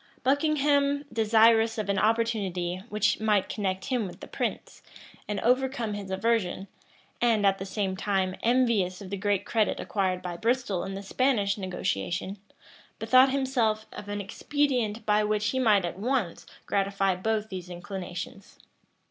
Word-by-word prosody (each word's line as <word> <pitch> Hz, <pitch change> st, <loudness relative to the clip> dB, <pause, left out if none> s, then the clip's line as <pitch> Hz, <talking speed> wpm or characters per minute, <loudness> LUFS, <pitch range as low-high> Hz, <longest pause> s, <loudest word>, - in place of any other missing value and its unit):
Buckingham, 285 Hz, 0 st, +2 dB
desirous 225 Hz, 0 st, +4 dB
of 215 Hz, -2 st, -2 dB
an 200 Hz, -1 st, +1 dB
opportunity 200 Hz, -6 st, 0 dB
which 210 Hz, 0 st, +1 dB
might 210 Hz, -3 st, +2 dB
connect 190 Hz, -3 st, -2 dB
him 245 Hz, -6 st, 0 dB
with 180 Hz, -, -11 dB
the -, -, -9 dB
prince, -, -, -4 dB, 0.5 s
and 210 Hz, -1 st, -2 dB
overcome 250 Hz, -2 st, +1 dB
his 200 Hz, -2 st, -6 dB
aversion, 195 Hz, -1 st, 0 dB, 0.5 s
and, 225 Hz, -4 st, +3 dB
at 195 Hz, 0 st, +3 dB
the 195 Hz, -, -5 dB
same 190 Hz, -1 st, -2 dB
time 190 Hz, -1 st, 0 dB
envious 230 Hz, -7 st, +2 dB
of 195 Hz, -2 st, -9 dB
the -, -, -1 dB
great 200 Hz, 0 st, 0 dB
credit 220 Hz, -2 st, +1 dB
acquired 185 Hz, -3 st, -1 dB
by 175 Hz, -1 st, -5 dB
Bristol 225 Hz, -4 st, 0 dB
in 195 Hz, -, -5 dB
the 195 Hz, -, -6 dB
Spanish 205 Hz, -2 st, +1 dB
negotiation, 185 Hz, -, -3 dB, 0.6 s
bethought 255 Hz, +1 st, +5 dB
himself 250 Hz, -5 st, 0 dB
of 205 Hz, -, -8 dB
an 205 Hz, 0 st, -3 dB
expedient 235 Hz, -1 st, -1 dB
by 210 Hz, 0 st, +3 dB
which 210 Hz, 0 st, 0 dB
he 260 Hz, -, -1 dB
might 210 Hz, -7 st, +4 dB
at 175 Hz, +2 st, -5 dB
once 230 Hz, -6 st, -1 dB, 0.2 s
gratify 195 Hz, -1 st, +1 dB
both 215 Hz, +3 st, -1 dB
these 185 Hz, -2 st, -7 dB
inclinations. 180 Hz, +1 st, -7 dB
210 Hz, 150 wpm, -27 LUFS, 190-230 Hz, 0.6 s, bethought